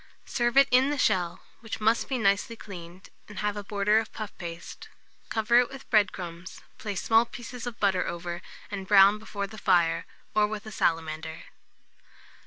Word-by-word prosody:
Serve 240 -1 0
it 275 0 +8
in 255 +2 +5
the 290 - -1
shell, 185 -8 +1 0.2
which 225 -2 -6
must 220 +2 +2
be 265 - 0
nicely 205 +1 +1
cleaned, 180 -4 -11 0.2
and 205 - -11
have 210 +1 -1
a 205 - -5
border 205 +1 +2
of 225 - -5
puff 215 -2 -7
paste; 170 -1 -8 0.4
cover 225 +2 +4
it 245 - +2
with 270 0 -11
bread 210 -4 +4
crumbs, 175 -1 -8 0.2
place 205 -4 -4
small 225 0 +5
pieces 240 +1 -8
of 235 -1 -6
butter 190 -3 +2
over, 175 0 -5 0.3
and 195 -2 -5
brown 200 +1 +7
before 205 -2 -4
the 215 +2 -10
fire, 170 -3 +2 0.3
or 210 0 +3
with 210 0 -6
a 215 - -8
salamander. 160 -3 -1
205 Hz, 180 wpm, -27 LUFS, 180-225 Hz, 0.4 s, it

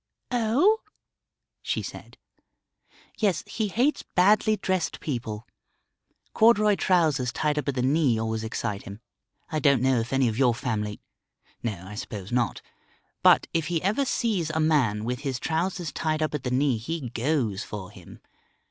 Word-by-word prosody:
"Oh?" 250 - +3 0.8
she - - -2
said. - - -9 1.0
"Yes, 205 -5 +1
he 220 -2 -2
hates 250 +9 +1
badly 215 +3 +4
dressed 185 -4 -1
people. 115 -6 -4 0.9
Corduroy 215 -2 +5
trousers 155 -10 +2
tied 150 +3 0
up 150 - -5
at 140 - 0
the 125 - 0
knee 135 -3 +3
always 110 0 -2
excite 110 -2 -3
him. 100 +2 -9 0.5
I 155 - 0
don't 140 -3 +4
know 130 -2 +3
if 115 +1 -4
any 135 -1 +3
of 115 +1 -2
your 125 -4 +4
family 105 -4 -3 0.6
no, 100 -6 -4
I 105 - -8
suppose 105 -1 -7
not. 120 -1 0 0.6
But - - +6
if 165 -2 0
he 175 -2 0
ever 215 +9 +2
sees 210 -11 0
a 155 +1 -1
man 135 -10 +2
with 125 +1 -2
his 135 -3 -3
trousers 170 0 -2
tied 155 +1 -1
up 155 - -2
at 150 - -2
the 125 - -3
knee 130 -1 +2
he 140 +2 -4
goes 120 -6 0
for 95 -3 -7
him. - - -14
140 Hz, 160 wpm, -26 LUFS, 115-175 Hz, 1.0 s, But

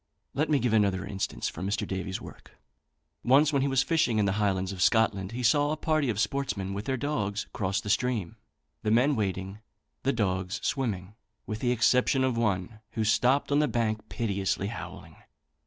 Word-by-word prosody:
Let 150 +3 0
me 150 - +4
give 125 -4 0
another 100 -4 +2
instance 95 -1 -3
from 95 +4 -4
Mr. 105 - -1
Davy's 95 0 -3
work. - - -13 0.7
Once 145 +4 +4
when 140 - +3
he 140 - +1
was 135 -1 +2
fishing 155 -9 +1
in 105 - +3
the 100 - +2
highlands 95 -2 0
of 95 -2 -6
Scotland, 100 -3 +2
he 125 +1 -4
saw 145 +5 +4
a 155 - -1
party 155 -3 +1
of 105 -3 -1
sportsmen, 105 -4 -1
with 100 +2 -4
their 130 -1 -1
dogs, 105 -8 -2
cross 95 -1 -1
the - - -8
stream, 110 -5 0 0.5
the 105 - -1
men 125 +6 +4
wading, 95 -2 -3 0.4
the 135 - +1
dogs 95 -5 -1
swimming, 105 -8 -2 0.3
with 110 0 -4
the 125 0 +1
exception 125 +3 +3
of 130 -2 +1
one, 105 -2 -1
who 110 - -1
stopped 125 +7 +2
on 145 - +4
the 150 - +3
bank 110 -3 -1
piteously 100 -3 -1
howling. 115 - -8
110 Hz, 190 wpm, -28 LUFS, 100-130 Hz, 0.7 s, me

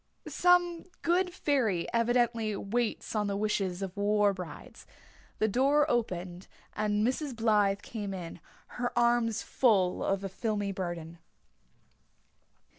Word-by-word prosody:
Some 355 -1 +3 0.2
good 360 +2 +2
fairy 255 - 0
evidently 230 -2 +1
waits 225 +3 -2
on 210 -1 +1
the 200 0 -1
wishes 200 -3 -1
of 190 -2 -5
war 205 0 +2
brides. 180 -5 -10 0.5
The 220 - +2
door 275 +7 +3
opened 185 -6 -2 0.3
and 210 0 0
Mrs. 265 +1 -2
Blythe 210 -3 +2
came 210 -4 -5
in, 175 -2 -7 0.4
her 245 0 -2
arms 235 -2 +2
full 195 -8 +2
of 195 0 0
a - - -2
filmy 205 0 -2
burden. 175 -3 -5
215 Hz, 120 wpm, -30 LUFS, 195-240 Hz, 0.5 s, Some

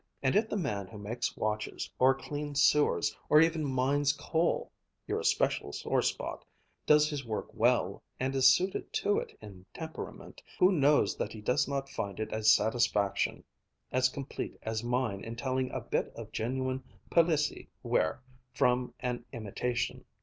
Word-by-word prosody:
And 130 - +2
if 215 +2 +3
the - - -1
man 105 - -2
who 110 - -11
makes 115 +4 -3
watches, 110 0 -2
or 130 +1 +5
cleans 145 +1 -4
sewers, 150 0 +3
or 150 - +7
even 165 0 +3
mines 140 +2 +2
coal 160 +3 0 0.3
your - - -1
especial - - +1
sore - - 0
spot - - -3 0.4
does 150 0 +6
his 145 -2 -4
work 110 -3 -4
well, - - +2 0.2
and 130 +1 -1
is 135 -1 +5
suited 185 +5 0
to 205 - +2
it - - -8
in 95 -3 -11
temperament, 160 -1 -8 0.2
who 185 - +5
knows 145 - +3
that - - -3
he 110 - -8
does 125 +4 +1
not 140 -1 -2
find 100 -7 -5
it 110 0 -3
a 110 - -2
satisfaction 105 -2 +2 0.5
as 130 0 +3
complete 135 +1 -6
as 110 0 -2
mine 120 -5 -1
in 115 +1 -6
telling 130 +1 -1
a - - -4
bit - - -1
of - - -8
genuine 130 +3 -2 0.3
Palissy 160 -3 +2
ware 80 +11 0 0.3
from 125 0 +1
an 125 -1 -2
imitation. 120 +2 -3
130 Hz, 160 wpm, -31 LUFS, 115-145 Hz, 0.5 s, or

